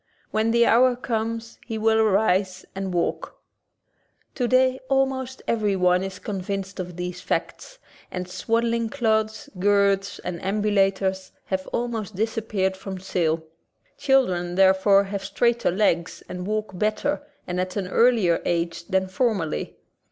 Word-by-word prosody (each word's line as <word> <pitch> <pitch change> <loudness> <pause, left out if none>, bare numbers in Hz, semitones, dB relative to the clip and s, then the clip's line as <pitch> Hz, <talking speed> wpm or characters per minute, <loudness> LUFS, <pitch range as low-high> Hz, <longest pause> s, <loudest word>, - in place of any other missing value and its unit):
When 220 +1 +1
the 235 +1 +4
hour 250 +2 +5
comes 230 -1 -3
he 225 -2 -5
will 220 0 +3
arise 195 -3 +2
and 195 -1 -4
walk. 175 -1 -2 0.9
Today 255 +1 +2
almost 265 -1 0
everyone 190 -5 +2
is 190 -1 -5
convinced 195 -1 -4
of 180 -1 -5
these 180 0 -5
facts, - - -3 0.3
and 180 -1 -5
swaddling 230 +4 0
clothes, 220 +3 0
girths, 200 0 +2
and 175 -1 -4
ambulators 195 -1 +1 0.2
have 190 -1 -3
almost 225 -4 -3
disappeared 210 -2 -1
from 190 0 -7
sale. 165 -4 0 0.5
Children, 185 -11 +1
therefore, 195 +1 +5
have 200 0 -5
straighter 235 +4 +1
legs 175 -3 0
and 180 +1 -6
walk 215 -2 -2
better 215 +8 0 0.2
and 180 0 -2
at 185 0 -4
an 195 -3 -2
earlier 220 -5 +3
age 170 0 -1
than 190 -1 +1
formerly. 195 -5 -1
200 Hz, 130 wpm, -24 LUFS, 185-225 Hz, 0.9 s, hour